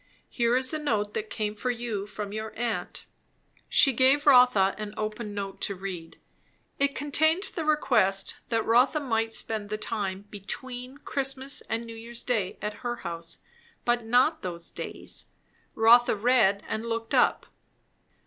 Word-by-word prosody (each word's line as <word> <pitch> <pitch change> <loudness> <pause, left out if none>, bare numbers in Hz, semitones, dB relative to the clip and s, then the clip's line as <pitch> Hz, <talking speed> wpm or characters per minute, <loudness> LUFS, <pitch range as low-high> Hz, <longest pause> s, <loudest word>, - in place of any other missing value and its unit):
Here 235 0 +2
is 260 +3 +1
a 310 - -1
note 215 -8 -1
that 215 0 -4
came 210 -1 -2
for 230 +4 -3
you, 230 -4 -3
from 205 0 -6
your 215 0 -5
aunt." 235 0 -3 0.6
She 270 - +5
gave 265 +4 +4
Rotha 250 -8 +6
an 210 0 -6
open 215 0 -4
note 195 -1 -5
to 200 - -1
read. 180 -3 -7 0.6
It 280 0 +1
contained 315 +5 +2
the 325 - -3
request 215 -11 +2
that 225 -2 0
Rotha 250 +7 +4
might 225 -5 -1
spend 215 -2 -2
the 215 - -2
time 200 -3 -3
between 250 +6 -7
Christmas 270 0 0
and 230 +1 -2
New 230 - -8
Year's 235 +1 -8
Day 210 -7 -1
at 210 0 -3
her 240 -1 -2
house, 165 -1 -4 0.4
but 240 -1 +1
not 250 +8 +3
those 170 -2 -4
days. - - -4 0.5
Rotha 235 +1 +6
read 210 -3 +3
and 220 0 -3
looked 230 -1 -4
up. - - +3
225 Hz, 155 wpm, -27 LUFS, 205-255 Hz, 0.6 s, Rotha